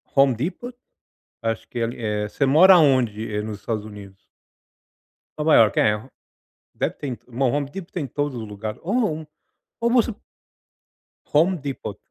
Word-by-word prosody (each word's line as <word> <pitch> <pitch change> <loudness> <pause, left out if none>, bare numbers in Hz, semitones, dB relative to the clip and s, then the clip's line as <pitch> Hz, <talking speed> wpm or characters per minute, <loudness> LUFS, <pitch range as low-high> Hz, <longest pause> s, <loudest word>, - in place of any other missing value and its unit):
Home 135 -3 +5
Depot 195 - -5 0.7
acho 115 0 -3
que 120 - -6
ele, 115 +1 -2
eh. 105 -2 -1
Você 140 - 0
mora 175 +7 +7
onde, 120 -8 +2
eh, 105 - -1
nos 105 -1 -6
Estados 110 -1 -3
Unidos? 100 -2 -12 1.1
Nova 155 +1 +2
Iorque, 110 -2 +5
é, 105 0 +2 0.7
deve - - -1
ter 145 - -6
em 125 -1 -7
Home 140 +2 +1
Depot 190 +2 -8
tem 165 -5 -3
em - - -3
todos 145 +2 -2
os 110 - -6
lugares 105 +1 -6
ou 195 +6 -2
não, 160 -8 -1 0.5
como 235 +1 +3
assim? 235 0 -2 1.2
Home 170 +5 +4
Depot 140 -3 -6
130 Hz, 160 wpm, -23 LUFS, 110-160 Hz, 1.2 s, mora